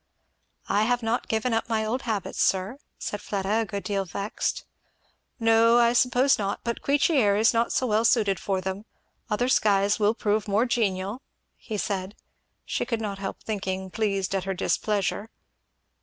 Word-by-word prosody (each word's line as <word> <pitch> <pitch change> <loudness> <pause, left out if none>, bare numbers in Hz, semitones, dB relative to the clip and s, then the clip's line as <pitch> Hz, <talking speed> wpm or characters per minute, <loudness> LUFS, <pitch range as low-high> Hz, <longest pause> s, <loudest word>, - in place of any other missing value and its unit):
"I 210 +1 +2
have 245 0 0
not 225 +2 -1
given 225 +2 0
up 225 +1 -1
my 220 -1 0
old 245 +4 -1
habits, 220 -6 -3
sir," 195 +8 +1 0.2
said 205 - -5
Fleda, 200 +2 -1
a - - -1
good 200 -1 -5
deal 200 -2 -1
vexed. 200 +4 -3 0.7
"No 225 +1 +5
I 235 0 +4
suppose 250 +2 +3
not 200 -1 -2
but 235 -1 -3
Queechy 290 +3 +2
air 205 -6 +4
is 220 +3 +4
not 230 0 +1
so 255 - +1
well 220 -1 +2
suited 215 -5 +2
for 190 -2 -1
them 190 +3 -5 0.4
other 230 +3 0
skies 205 -4 +3
will 210 +1 +3
prove 210 -2 0
more 210 +4 +2
genial," 215 -2 -1 0.3
he 215 - -6
said; 195 0 -3 0.5
she - - -2
could 230 -3 -2
not 205 -3 -4
help 195 -1 -6
thinking, 190 -3 -3
pleased 195 -3 -1
at 190 -1 -1
her 195 -1 -2
displeasure. 205 +2 -1
215 Hz, 170 wpm, -26 LUFS, 195-230 Hz, 0.7 s, No